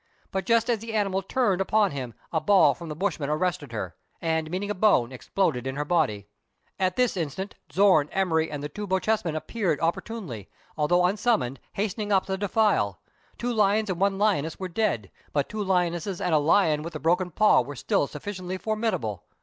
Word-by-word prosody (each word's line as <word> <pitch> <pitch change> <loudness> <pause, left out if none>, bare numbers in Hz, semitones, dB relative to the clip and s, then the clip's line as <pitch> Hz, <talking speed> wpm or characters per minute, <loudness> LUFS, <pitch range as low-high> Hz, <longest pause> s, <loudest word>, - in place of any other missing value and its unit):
But 190 -1 -3
just 230 -1 +3
as 235 -3 +1
the 225 +1 -6
animal 195 -2 +1
turned 195 -2 +1
upon 205 0 +2
him, 130 -5 -5 0.2
a 160 - +1
ball 200 -2 +5
from 170 -2 -9
the 150 - -4
bushman 165 -5 -2
arrested 155 -3 -1
her, 95 -7 -4 0.3
and, 160 -1 -1
meeting 195 +4 -2
a - - +1
bone, 185 - +3
exploded 130 -1 -1
in 130 - -3
her 145 +1 -2
body. 145 - +1 0.5
At 185 -1 +1
this 250 -2 +2
instant 185 +4 -3 0.2
Zorn, 185 -7 +4
Emery, 160 -4 +1
and 145 -1 -5
the - - -2
two 210 +7 -6
Bochjesmen 190 -3 0
appeared 175 -1 -1
opportunely, 165 - -3 0.3
although 175 +4 +3
un 190 +4 +1
summoned, 170 - +1
hastening 210 +1 -2
up 195 -2 +3
the 190 - -2
defile. 195 - +1 0.4
Two 245 0 -2
lions 210 -1 +2
and 180 0 -4
one 195 0 +2
lioness 190 -7 +1
were 190 - -3
dead; 175 - -1 0.2
but 145 -2 +1
two 215 -1 -3
lionesses 180 0 0
and 180 -4 0
the 155 - +5
lion 155 0 +3
with 170 +2 -6
the - - -5
broken 175 +4 +1
paw 210 +1 +4
were 140 +4 -7
still 140 - +1
sufficiently 185 +4 -5
formidable. 215 - -2
180 Hz, 190 wpm, -26 LUFS, 150-205 Hz, 0.5 s, ball